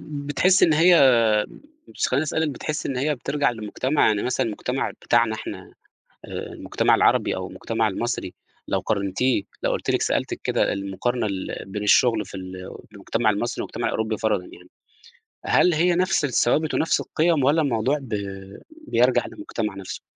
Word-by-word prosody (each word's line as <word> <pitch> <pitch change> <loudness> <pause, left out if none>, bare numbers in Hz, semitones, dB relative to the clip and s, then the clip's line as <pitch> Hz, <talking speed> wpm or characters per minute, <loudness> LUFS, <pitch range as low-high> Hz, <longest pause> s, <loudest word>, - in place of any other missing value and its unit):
بتحسي 150 +5 +2
إن 160 - +3
هي 160 -6 +6 0.7
مش - - -2
خليني 140 +4 +1
أسألِك 160 0 -1
بتحسي 150 +3 -4
إن 130 - -3
هي 150 +3 0
بترجع 145 +2 0
للمجتمع، 120 +6 0
يعني 105 -2 +1
مثلًا 130 - 0
المجتمع 125 +4 -3
بتاعنا 115 -2 +2
إحنا 95 -3 -8 0.5
آآ، - - -6
المجتمع - - +1
العربي - - +2
أو - - -5
المجتمع 115 -1 -2
المصري، 105 -2 -3 0.3
لو - - 0
قارنتيه 100 +3 0 0.2
لو - - +1
قُلت - - -3
لِك - - +1
سألتِك - - -1
كده - - +1
المقارنة 100 +5 -2
ال 95 -2 -5
بين 105 +2 -5
الشغل 110 0 +4
في 95 - -9
ال 95 0 -8 0.4
في - - -27
المجتمع 105 +3 0
المصري 110 +3 -1
والمجتمع - - -4
الأوروبي 110 -1 -2
فرَضًا 105 -4 0
يعني، 90 0 -15 0.8
هل 180 - +4
هي 175 +3 +2
نفس 185 -3 +1
الثوابت 145 +4 +1
ونفس 165 - +1
القِيَم، 160 -2 +1
والَّا 150 +5 +3
الموضوع 130 +1 +1
ب 125 -5 -8 0.7
بيرجع 125 +2 +3
للمجتمع 115 - -5
نفسُه؟ 95 -1 -7
120 Hz, 160 wpm, -23 LUFS, 105-150 Hz, 0.8 s, هي